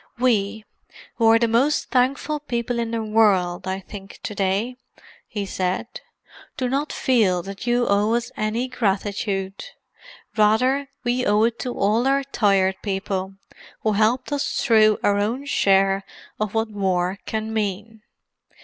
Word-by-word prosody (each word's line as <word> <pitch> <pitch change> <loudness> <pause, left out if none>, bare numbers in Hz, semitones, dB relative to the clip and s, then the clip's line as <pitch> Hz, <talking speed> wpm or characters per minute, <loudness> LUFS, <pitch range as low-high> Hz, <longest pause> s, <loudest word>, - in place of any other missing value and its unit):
"We, 220 -3 +1 0.5
who 230 - +3
are 225 0 +7
the 235 0 +2
most 250 +7 +1
thankful 275 +4 +1
people 240 -4 -3
in 230 -1 -1
the 230 -1 -2
world, 195 -5 +2
I 190 +1 -2
think, 195 0 -11
to - - -4
day," 200 +5 -1 0.5
he 205 -2 -4
said, 185 +4 -3 0.6
"do 255 - -1
not 275 +4 -1
feel 210 - +2
that 195 +5 -8
you 240 0 +2
owe 205 +3 +2
us 240 0 -2
any 220 +4 -1
gratitude. 200 -4 -2 0.7
Rather 255 +6 +2
we 245 0 0
owe 210 0 +3
it 230 0 0
to 250 -1 -4
all 220 +6 +2
our 275 +1 +2
Tired 195 -7 +2
People—who 195 +1 -4
helped 225 +6 +1
us 285 -1 -1
through 215 -4 +5
our 205 0 +3
own 235 +7 -1
share 195 -6 +2 0.4
of 215 0 -2
what 225 0 0
war 190 -2 -1
can 220 0 -3
mean. 215 +1 -3
215 Hz, 145 wpm, -22 LUFS, 195-240 Hz, 0.7 s, are